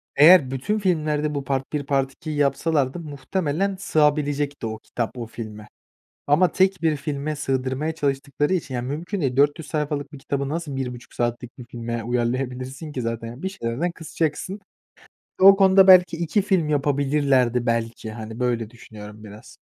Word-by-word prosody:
Eğer 150 -2 +7
bütün 210 +12 -1
filmlerde 155 -5 0
bu 140 - -2
part 135 +2 -3
1, 145 -2 -2
part 135 -1 0
2'yi 150 +1 -6
yapsalardı 145 +1 +1
muhtemelen 160 +5 -2
sığabilecekti 145 -5 +1
o 110 0 -5
kitap, 120 +2 -4
o 120 - -4
filme. 105 -2 -8 0.6
Ama 165 +5 +3
tek 190 -2 +2
bir 155 -2 +2
filme 145 +1 -3
sığdırmaya 135 +2 -2
çalıştıkları 145 +2 -1
için, 140 -7 -3
yani, 120 0 -2
mümkün 175 +7 -4
değil, 130 -3 -1
400 145 +3 +2
sayfalık 150 -2 -2
bir 145 - -9
kitabı 140 0 -3
nasıl 155 -3 -4
1.30 125 -2 -6
saatlik 120 +1 -3
bir 125 - -8
filme 115 -1 -4
uyarlayabilirsin 130 +4 -3
ki 125 - -3
zaten, 115 0 -3
yani, 120 +7 -9
bir 190 - -1
şeylerden 160 - -2
kısacaksın. 165 +4 -3 0.8
O 195 +1 +9
konuda 190 0 +6
belki 180 -3 +7
2 170 +5 0
film 185 -6 +1
yapabilirlerdi, 140 -4 +1
belki, 115 -1 -2
hani, 110 +1 -8
böyle 115 -3 -1
düşünüyorum 105 -2 -12
biraz. 105 +2 -13
140 Hz, 160 wpm, -23 LUFS, 125-160 Hz, 0.8 s, O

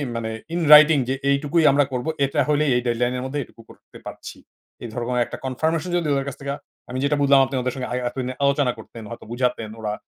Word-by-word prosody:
মানে 110 -1 -3 0.2
in 175 - -1
writing 150 -1 +8
যে, 135 - +1
"এইটুকুই 145 +4 +2
আমরা 140 +1 +3
করবো, 125 +5 -2 0.2
এটা 140 +2 -2
হইলে 150 0 +2
এই 125 - +2
deadline 120 +1 0
এর 125 - -4
মধ্যে 140 +2 -3
এটুকু 115 - -17
করতে - - -16
পারছি।" - - -9 0.5
এই 120 - -4
ধরনের 125 0 -1
একটা - - -8
confirmation 160 +6 -1
যদি 170 -3 -1
ওদের 135 -1 -1
কাছ 140 - -5
থেকে 140 0 -3 0.4
আমি 125 - -4
যেটা 140 +1 +2
বুঝলাম 140 -1 +5
আপনি 135 0 -5
ওদের 125 0 -2
সঙ্গে 130 -1 -5
আই - - -1
এতদিনে 130 0 -4
আলোচনা 140 -2 +2
করতেন, 110 +1 -11
হয়তো 115 - -9
বুঝাতেন 120 -3 -1
ওরা, 105 -1 -3
135 Hz, 220 wpm, -22 LUFS, 125-145 Hz, 0.5 s, writing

